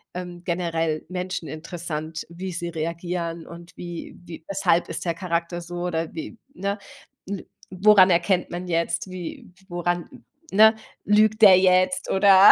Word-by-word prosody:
ähm, 180 Hz, -1 st, -7 dB
generell 165 Hz, -3 st, -1 dB
Menschen 180 Hz, -2 st, -4 dB
interessant, 160 Hz, 0 st, -5 dB
wie 185 Hz, +2 st, -6 dB
sie 170 Hz, 0 st, -4 dB
reagieren 170 Hz, 0 st, -4 dB
und 170 Hz, 0 st, -12 dB
wie 175 Hz, -1 st, -7 dB
wie 165 Hz, -2 st, -10 dB
weshalb 180 Hz, -3 st, +1 dB
ist 165 Hz, -, -5 dB
der 170 Hz, -, +1 dB
Charakter 170 Hz, 0 st, -2 dB
so 175 Hz, +1 st, -8 dB
oder 165 Hz, -2 st, -2 dB
wie 170 Hz, +8 st, -7 dB, 0.2 s
ne? 200 Hz, +2 st, -2 dB, 0.5 s
N 200 Hz, -2 st, -5 dB, 0.2 s
woran 190 Hz, 0 st, +6 dB
erkennt 180 Hz, +1 st, +2 dB
man 180 Hz, +1 st, -5 dB
jetzt 170 Hz, +2 st, -1 dB
wie 180 Hz, 0 st, -7 dB, 0.2 s
woran 175 Hz, 0 st, -3 dB, 0.3 s
ne? 220 Hz, +2 st, +7 dB, 0.3 s
Lügt 215 Hz, +1 st, +3 dB
der 190 Hz, -3 st, +9 dB
jetzt 185 Hz, 0 st, +3 dB
oder 195 Hz, 0 st, +8 dB
175 Hz, 145 wpm, -24 LUFS, 170-185 Hz, 0.5 s, der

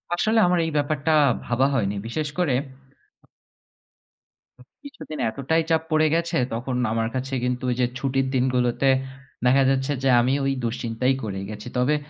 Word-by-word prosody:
আসলে 220 Hz, +5 st, +2 dB
আমার 180 Hz, -1 st, +2 dB
এই 160 Hz, -, -3 dB
ব্যাপারটা 145 Hz, +1 st, 0 dB, 0.3 s
ভাবা 125 Hz, +3 st, +2 dB
হয়নি। 105 Hz, -5 st, 0 dB
বিশেষ 150 Hz, +6 st, -3 dB
করে 175 Hz, -7 st, +1 dB, 2.3 s
কিছুদিন 280 Hz, -, -9 dB
এতটাই 140 Hz, +8 st, 0 dB
চাপ 160 Hz, -1 st, +3 dB
পড়ে 155 Hz, 0 st, +4 dB
গেছে 170 Hz, 0 st, 0 dB, 0.2 s
তখন 125 Hz, +3 st, -3 dB, 0.2 s
আমার 115 Hz, 0 st, 0 dB
কাছে 135 Hz, +1 st, -3 dB
কিন্তু 125 Hz, 0 st, -2 dB
ওই -, -, -1 dB
যে 125 Hz, -, +4 dB
ছুটির 135 Hz, -1 st, 0 dB
দিনগুলোতে 125 Hz, +1 st, +1 dB, 0.6 s
দেখা 135 Hz, +2 st, +5 dB
যাচ্ছে 135 Hz, +1 st, 0 dB
যে 135 Hz, -, +3 dB
আমি 130 Hz, +2 st, +1 dB
ওই 135 Hz, -, +1 dB
দুশ্চিন্তাই 115 Hz, +2 st, -1 dB
করে 95 Hz, -3 st, -4 dB
গেছি। 105 Hz, +2 st, -8 dB
তবে 125 Hz, +5 st, +2 dB
135 Hz, 150 wpm, -24 LUFS, 125-155 Hz, 2.3 s, দেখা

